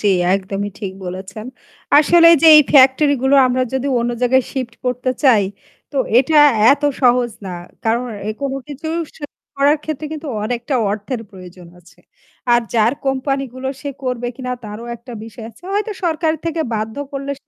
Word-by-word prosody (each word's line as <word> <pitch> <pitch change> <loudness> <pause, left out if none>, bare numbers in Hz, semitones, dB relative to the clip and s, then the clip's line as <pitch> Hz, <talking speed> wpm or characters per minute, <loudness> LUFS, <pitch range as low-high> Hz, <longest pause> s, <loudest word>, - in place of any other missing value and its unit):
জী, 210 - +1 0.3
একদমই 195 +1 -3
ঠিক 195 -3 -4
বলেছেন। 190 +4 -7 0.5
আসলে 335 +3 +6
যে - - +6
এই 300 - +8
ফ্যাক্টরি 280 +1 +5
গুলো 265 +1 +3
আমরা 255 0 0
যদি 265 +1 -1
অন্য 235 +1 -1
জায়গায় 255 +1 +3
শিফট 255 -4 -4
করতে 250 0 -1
চাই 235 -8 +5 0.5
তো 285 - -8 0.2
এটা 290 +5 +2 0.4
এত 285 +1 -3 0.2
সহজ 245 -2 +3 0.2
না। - - -5 0.3
কারণ 230 +2 +1 0.4
কোনো 275 -1 -2
কিছু 295 +2 -7 0.3
শিফট 290 -2 -10 0.2
করার 285 +2 +3
ক্ষেত্রে 310 -1 -4
কিন্তু 310 -1 -6 0.2
অনেকটা 240 +4 -3 0.2
অর্থের 215 +4 -4
প্রয়োজন 180 -2 -13
আছে। 175 0 -21 0.5
আর 240 - +5
যার 225 +1 +3
কোম্পানি 270 +1 -1
গুলো 260 +1 -5
সে 285 - -5
করবে 250 -2 -3
কিনা 250 -1 -4
তারও 210 +2 -8
একটা 240 +2 -12
বিষয় 225 0 -10
আছে। 225 - -23
হয়তো 420 +2 -1
সরকার 320 -1 +1
থেকে 330 -1 -2
বাধ্য 220 0 -4 0.2
করলে 275 0 -5
সে - - -60
255 Hz, 170 wpm, -18 LUFS, 225-285 Hz, 0.5 s, এই